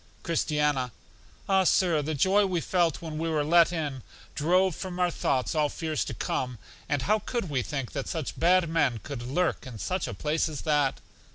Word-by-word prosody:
Christiana: 150 -6 0 0.6
Ah, 190 -1 +4
Sir, 175 -4 +3
the 155 +2 -2
joy 190 +8 +4
we 180 -2 0
felt 170 -1 0
when 155 -2 -5
we 165 0 -1
were 155 -2 +1
let 170 +2 +5
in, 150 -6 -3 0.3
drove 180 +3 +2
from 185 -2 -6
our 180 -1 +2
thoughts 130 -5 0
all 150 -2 +2
fears 160 -2 -2
to - - -5
come. 125 -2 -2 0.3
And 145 -3 0
how 215 +1 +2
could 220 -7 -3
we 130 -3 +1
think 135 0 -4
that 140 -2 -4
such 160 -5 -3
had 180 +1 +4
men 155 -7 +1
could 140 -4 -6
lurk 140 +6 -1
in 120 -3 -8
such 185 - -2
a - - -5
place 155 +2 0
as 150 - -6
that? 145 -4 +1
155 Hz, 195 wpm, -27 LUFS, 145-175 Hz, 0.6 s, let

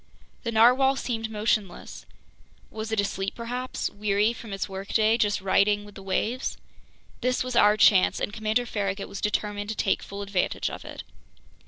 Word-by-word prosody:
The 230 - -3
narwhale 250 +4 +5
seemed 225 -4 -3
motionless. 210 -3 -2 0.6
Was 220 0 -5
it 220 - 0
asleep 195 -1 -2
perhaps, 245 +2 -3
weary 210 +2 +1
from 230 -2 -10
its 195 0 -3
workday, 200 +3 +1
just 205 -2 +1
riding 205 +2 +2
with 205 - -13
the 195 - -11
waves? 220 +6 -2 0.6
This 250 +1 +1
was 255 -1 -4
our 210 -1 +5
chance, 200 -3 +5
and 205 - -3
Commander 220 +3 0
Farragut 200 -3 -3
was 200 - -7
determined 205 0 -2
to 220 - -2
take 195 - +1
full 200 0 -7
advantage 195 -2 -1
of - - -8
it. - - -8
210 Hz, 165 wpm, -26 LUFS, 200-230 Hz, 0.6 s, narwhale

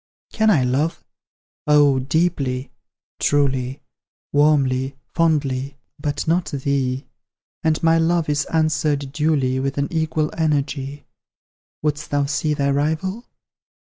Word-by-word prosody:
Can 220 0 +3
I 155 -11 +4
love? 135 +6 0 0.6
Oh, 145 -2 +5
deeply 140 -2 -1 0.5
truly 135 -2 0 0.5
Warmly 135 -3 +2 0.2
fondly 140 -4 0 0.2
but 145 +1 -3
not 170 +2 +2
thee; 135 -1 -1 0.6
And 160 -1 0
my 165 0 +4
love 165 0 +1
is 145 -1 0
answered 155 -3 0
duly, 140 -4 +1
With 135 +1 -2
an 140 +4 -1
equal 155 -1 0
energy. 145 -2 -1 0.8
Wouldst 150 0 -1
thou 145 -1 +1
see 150 +2 0
thy 140 -1 +1
rival? 160 - -1
145 Hz, 115 wpm, -21 LUFS, 135-160 Hz, 0.8 s, Oh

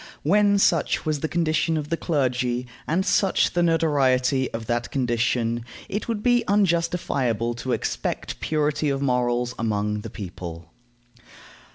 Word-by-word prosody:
When 200 +5 +4
such 170 -5 +2
was 155 -2 0
the 160 - -1
condition 160 -1 +1
of 150 -1 -4
the 165 - +1
clergy, 125 -6 0 0.2
and 185 +5 +1
such 195 -2 +2
the 175 - +2
notoriety 135 -6 +2
of 115 0 -5
that 120 +2 -1
condition, 120 -2 0 0.2
it 205 - -4
would 220 -3 -2
be 245 -1 +3
unjustifiable 170 - +1
to 130 +2 -4
expect - - -3
purity 150 -1 0
of 140 0 -1
morals 125 -1 +1
among 105 -2 -1
the - - -7
people. 85 -4 -8
140 Hz, 140 wpm, -24 LUFS, 120-165 Hz, 0.2 s, When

